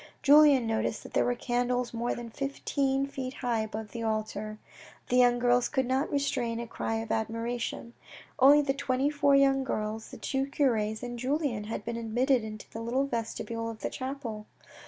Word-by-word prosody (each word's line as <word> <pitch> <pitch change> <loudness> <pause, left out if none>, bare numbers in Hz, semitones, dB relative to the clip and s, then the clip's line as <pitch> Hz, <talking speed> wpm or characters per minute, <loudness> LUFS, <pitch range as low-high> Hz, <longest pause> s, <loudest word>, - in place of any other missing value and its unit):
Julien 290 -3 +7
noticed 225 0 -1
that - - -12
there - - +3
were 245 - +1
candles 245 0 -1
more 235 +1 -1
than 235 -1 -7
fifteen 275 0 -1
feet 265 -2 -6
high 240 -3 -1
upon 220 0 -4
the 235 - -5
altar. 215 -1 -3 0.5
The 250 - +3
young 245 -1 +5
girls 245 0 +3
could 265 -3 0
not 260 +3 0
restrain 250 -5 -1
a 235 - -4
cry 225 -1 -3
of 225 0 -3
admiration. 230 +1 -3 0.5
Only 285 +3 +7
the 270 -1 +1
twenty 275 0 0
four 285 -1 +3
young 270 -1 +4
girls, 220 -3 -3
the - - -10
two 270 0 -1
cures 225 -6 0
and 240 -1 -5
Julien 260 -4 -1
had 210 -1 -5
been 235 0 -3
admitted 240 +2 +1
into 215 -1 -8
the 225 - -6
little 250 +4 0
vestibule 230 -2 -3
of 225 -1 -8
the - - -3
chapel. 255 -5 -5
245 Hz, 180 wpm, -29 LUFS, 225-270 Hz, 0.5 s, Julien